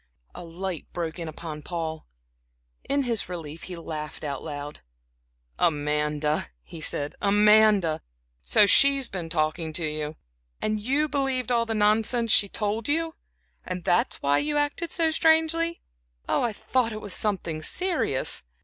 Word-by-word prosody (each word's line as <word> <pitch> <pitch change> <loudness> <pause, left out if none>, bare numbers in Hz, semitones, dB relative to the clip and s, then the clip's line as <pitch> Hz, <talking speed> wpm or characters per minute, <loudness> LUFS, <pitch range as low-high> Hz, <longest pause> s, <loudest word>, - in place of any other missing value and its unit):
A - - -9
light 175 +1 -5
broke 170 0 -4
in 165 - -4
upon 155 -1 -7
Paul. 160 -1 -5 0.8
In 280 0 +2
his 230 -7 -1
relief 165 -3 -7
he 185 - -7
laughed 155 -3 -6
out 140 -3 -3
loud. 145 -1 -7 0.8
"Amanda," 150 0 +1 0.2
he 160 - -11
said. 145 -1 -2
"Amanda! 205 -4 +4 0.4
So 65 - +5
she 275 +7 +6
has 270 -3 -2
been 180 -6 -5
talking 160 0 -1
to 160 +1 0
you? 150 0 -3 0.4
And 215 0 -1
you 275 +8 +1
believed 265 -4 -1
all 235 -1 +2
the 225 - -1
nonsense 220 +2 +2
she 200 - +5
told 210 +2 -2
you? 325 +2 0 0.5
And 185 -1 -5
that 175 - +2
is - - -15
why 140 0 +3
you 295 0 0
acted 290 +3 -1
so 330 -2 +3
strangely. 325 +1 +2 0.5
I 240 - +1
thought 230 +2 0
it 215 - -5
was 205 -3 -3
something 170 -7 -1
serious!" 335 - 0
195 Hz, 150 wpm, -26 LUFS, 155-250 Hz, 0.8 s, she